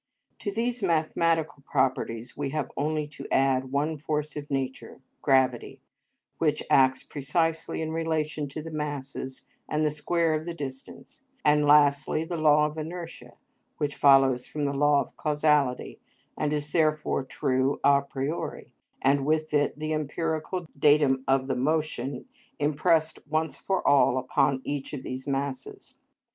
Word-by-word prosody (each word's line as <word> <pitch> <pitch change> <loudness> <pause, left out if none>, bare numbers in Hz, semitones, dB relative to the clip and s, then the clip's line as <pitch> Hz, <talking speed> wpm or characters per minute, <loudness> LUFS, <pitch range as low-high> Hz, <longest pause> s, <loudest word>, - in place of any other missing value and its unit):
To 205 - -3
these 235 +3 -1
mathematical 165 -3 +1
properties 130 -4 -1
we 145 -1 -3
have 150 0 -3
only 150 +1 -1
to 140 -2 -9
add 130 -1 +2
one 150 +2 -1
force 150 0 -3
of 145 -1 -6
nature, 135 -2 -4 0.2
gravity, 130 -3 +1 0.6
which 150 -2 +1
acts 130 -1 +4
precisely 160 +3 -1
in 160 - -3
relation 155 -2 -1
to 150 +2 -6
the 165 - -7
masses 140 -3 -5 0.2
and 155 0 +1
the 150 - +2
square 165 +2 0
of 155 0 -2
the 170 -1 -5
distance; 135 - -9 0.2
and, 150 0 +4
lastly, 145 +1 +4
the 170 +2 -4
law 150 -2 +4
of 150 +1 -4
inertia, 165 +2 -7 0.4
which 145 -1 -2
follows 135 -3 +4
from 150 -1 -3
the 140 - -1
law 145 0 +3
of - - -9
causality 150 -4 +1 0.4
and 150 - -1
is 150 0 -2
therefore 155 -3 +1
true 130 +1 0
a 140 0 +5
priori, 140 +3 -5 0.3
and 140 +1 +3
with 155 +1 0
it 145 -1 +1
the 155 +1 -2
empirical 160 +3 -2
datum 145 -3 +4
of 135 0 +2
the 130 -1 -1
motion 140 -2 -1 0.3
impressed, 155 +2 +1
once 155 +1 -1
for 190 -1 -1
all, 135 -2 +5
upon 135 +1 +1
each 145 0 -4
of 135 -3 -5
these 130 +1 -6
masses. 135 -1 -4
150 Hz, 150 wpm, -27 LUFS, 135-155 Hz, 0.6 s, a